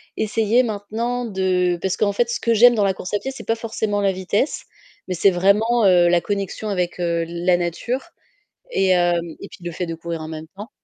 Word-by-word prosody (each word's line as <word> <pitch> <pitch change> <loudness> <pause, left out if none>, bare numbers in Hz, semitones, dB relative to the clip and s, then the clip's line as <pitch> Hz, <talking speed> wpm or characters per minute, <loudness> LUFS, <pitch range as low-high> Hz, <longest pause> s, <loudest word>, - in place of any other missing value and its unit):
essayer 220 +2 +2
maintenant 230 +3 -3
de 185 -4 0
parce 190 -1 -1
qu'en 205 -1 +1
fait 235 +3 +1
ce - - -2
que 230 - +1
j'aime 240 +2 +6
dans 210 - +2
la 195 - +2
course 185 +1 -8
à - - +1
pied, 265 - -4
c'est 270 - -9
pas 225 - +2
forcément 220 -2 -2
la 195 -1 +2
vitesse 190 - -1 0.5
mais 185 - -1
c'est 195 +3 +4
vraiment, 210 +6 +3
heu, 180 -2 +5
la 175 -1 +3
connexion 200 +1 -3
avec, 180 -3 -2
heu, 170 -1 0
la 175 +1 +1
nature 240 - -3 0.6
et 195 - +2
hem, 175 -1 +3 0.2
et 200 - -8
puis, 175 - -14
le 175 - -3
fait 175 +2 -4
de 165 - -4
courir 165 0 -5
en 155 - -7
même 160 0 -7
temps 215 +6 -9
195 Hz, 220 wpm, -21 LUFS, 175-225 Hz, 0.6 s, j'aime